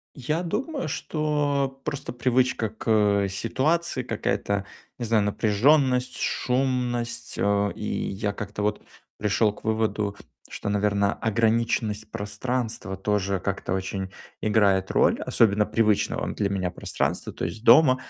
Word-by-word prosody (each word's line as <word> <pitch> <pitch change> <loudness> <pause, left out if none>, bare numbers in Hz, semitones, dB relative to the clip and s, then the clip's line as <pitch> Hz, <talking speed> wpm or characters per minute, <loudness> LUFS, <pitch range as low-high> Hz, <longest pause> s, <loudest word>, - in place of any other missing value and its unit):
Я 150 +5 -1
думаю, 210 - -2
что 145 -3 -1
просто 145 -2 -4
привычка 125 -2 +1
к, 110 +1 -9 0.4
э, - - -1
ситуации 130 - 0
какая-то, 100 -3 -1 0.3
не 120 - -3
знаю, 110 -2 +2
напряжённость, 125 +5 +2
шумность. 125 -2 -1
Э, 100 0 +2
и - - -7 0.3
я 100 +1 -2
как-то 105 0 -5
вот 105 +1 -1 0.4
пришёл 105 0 +2
к - - -17
выводу, 110 -2 0 0.3
что, - - -4
наверно, 100 0 +2
ограниченность 110 -1 0
пространства 110 -1 -3
тоже, 100 0 0
как-то 95 0 -2
очень 95 0 -3 0.3
играет 100 -3 +2
роль, - - +3
особенно 105 -2 +3
привычного 105 -1 +1
для 100 - 0
меня 95 -2 -1
пространства, - - -2
то - - -4
есть 110 - -5
дома. 130 +2 +7
110 Hz, 125 wpm, -25 LUFS, 100-130 Hz, 0.4 s, дома